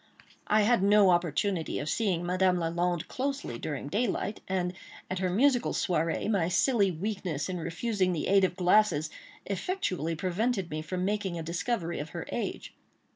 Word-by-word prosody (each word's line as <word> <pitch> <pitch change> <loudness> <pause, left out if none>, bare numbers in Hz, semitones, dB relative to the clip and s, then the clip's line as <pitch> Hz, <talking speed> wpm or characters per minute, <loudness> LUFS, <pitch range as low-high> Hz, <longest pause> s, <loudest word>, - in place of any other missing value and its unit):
I 215 +1 +4
had 235 0 +3
no 200 -1 +6
opportunity 175 +1 0
of 145 - -4
seeing 180 -3 0
Madame 185 0 +2
Lalande 175 0 -1
closely 270 - -3
during 145 -2 -4
daylight; 210 +2 -1
and, 180 -1 -1 0.4
at 185 - -1
her 185 -1 0
musical 245 +6 +2
soirée, 165 -1 0
my 195 -6 +1
silly 205 +1 +3
weakness 180 -4 -3
in 180 -1 -3
refusing 185 +3 -1
the 165 -4 -2
aid 195 0 +4
of 180 -1 +1
glasses 180 -4 +3 0.3
effectually 185 - -2
prevented 190 +2 -1
me 155 0 -3
from 180 +3 -3
making 200 -3 -1
a 165 - -4
discovery 170 +2 -2
of 150 +2 -5
her - - -4
age. - - -4
185 Hz, 160 wpm, -29 LUFS, 170-210 Hz, 0.4 s, no